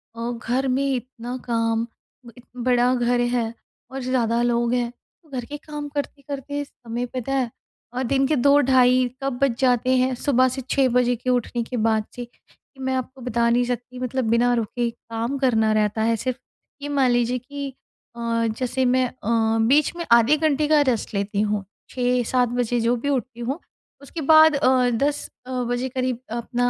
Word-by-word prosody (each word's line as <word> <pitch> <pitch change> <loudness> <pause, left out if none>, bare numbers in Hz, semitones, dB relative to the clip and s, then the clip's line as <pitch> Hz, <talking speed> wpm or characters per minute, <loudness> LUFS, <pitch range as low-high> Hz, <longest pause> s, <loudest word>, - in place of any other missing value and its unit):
अ, 235 +1 -3 0.2
घर 260 +3 +1
में 260 +2 +1
इतना 250 0 -5
काम, 230 -1 +1 0.5
इ - - -12 0.2
बड़ा 245 0 +2
घर 245 0 +1
है 240 -2 0 0.4
और 270 0 -5
ज़्यादा 240 -2 +1
लोग 240 0 +1
हैं। 245 -1 0 0.3
तो 315 - -24
घर 255 -4 -4
के 295 +4 -7
काम 295 0 -7
करते-करते 285 0 -4
समय 240 -3 -6
पता 255 +2 -2
है 260 -3 +1 0.4
और 255 +1 -2
दिन 270 +2 +2
के 305 - +2
2 280 +2 +5
ढ़ाई 255 -1 +4 0.2
कब 275 -1 0
बज 275 -4 +3
जाते 255 0 +3
हैं 255 +1 +2
सुबह 255 -1 +3
से 265 - -4
6 270 -2 +3
बजे 245 0 +3
के 245 +2 -4
उठने 245 -1 0
के 245 +2 -5
बाद 220 -1 +1
से 245 - -5
कि 255 +3 -29
मैं 260 0 0
आपको 260 +1 -5
बता 235 -1 +1
नहीं 240 +1 +3
सकती 245 +1 -5
मतलब 255 0 -2
बिना 240 +2 +3
रुके 235 +1 -1
काम 230 +3 -4
करना 225 -5 +2
रहता 215 0 +1
है 230 0 +2
सिर्फ़। 255 +3 -3 0.4
ये 290 - -5
मान 275 -3 +2
लीजिए 245 +1 +1
कि 280 +2 -6 0.5
अ, - - -10 0.3
जैसे 255 +3 -1
मैं 255 +1 +3
अ, 225 -2 0
बीच 295 +6 +3
में 340 -1 -4
आधे 235 +6 +6
घंटे 300 -1 +1
का 300 -1 +5
रेस्ट 230 -3 -2
लेती 200 0 -1
हूँ। 210 -1 0 0.3
6-7 250 0 +1
बजे 245 0 0
जो 235 +1 +2
भी 285 +5 -3
उठती 255 -3 -2
हूँ 265 +7 -3 0.4
उसके 300 +4 -7
बाद 315 +1 +7
अ, 255 -3 +3
10 280 +5 -1 0.2
अ, - - -7 0.2
बजे 245 +2 -1
करीब 255 -2 -2
अपना 240 +1 -1
250 Hz, 185 wpm, -23 LUFS, 235-265 Hz, 0.5 s, बाद